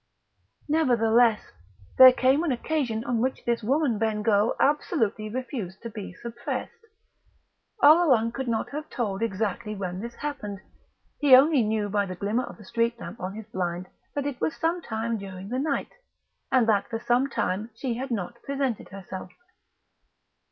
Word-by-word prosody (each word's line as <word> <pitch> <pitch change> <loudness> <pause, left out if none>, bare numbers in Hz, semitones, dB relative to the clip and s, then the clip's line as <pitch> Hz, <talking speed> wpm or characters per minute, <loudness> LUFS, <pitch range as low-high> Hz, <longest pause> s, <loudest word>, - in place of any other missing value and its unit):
Nevertheless, 240 -7 +3 0.6
there 260 0 +12
came 265 +4 +2
an 330 - 0
occasion 245 -4 -1
on 240 -2 -1
which 260 +3 -1
this 235 0 0
woman 255 -1 +1
Bengough 215 -1 +2
absolutely 225 - +1
refused 230 - -5
to 230 - -6
be 210 -2 -7
suppressed. 235 - -6 1.0
Oleron 285 -8 +6
could 265 +2 -4
not 230 -2 -1
have 300 +2 -6
told 210 -5 -3
exactly 215 0 -2
when 185 -2 -4
this 235 +3 -7
happened; 245 -9 -5 0.6
he 285 -4 +8
only 280 +1 +5
knew 215 -1 0
by 205 0 0
the 185 - -5
glimmer 210 +7 -1
of - - -11
the 210 - -14
street 230 +2 0
lamp 235 - -8
on 190 -1 -5
his 220 -1 -7
blind 180 -3 -3 0.3
that 285 -1 -1
it 285 -4 -4
was 320 - 0
some 335 +2 0
time 225 -3 -3
during 195 0 -8
the 255 +2 -1
night, 280 0 -1 0.6
and 250 -3 +4
that 205 -2 +2
for 230 - -2
some 245 +4 +1
time 205 -2 -2
she 250 +1 -2
had 260 +4 -4
not 235 +1 -4
presented 275 -5 -2
herself. 190 -1 -8
230 Hz, 160 wpm, -26 LUFS, 210-265 Hz, 1.0 s, there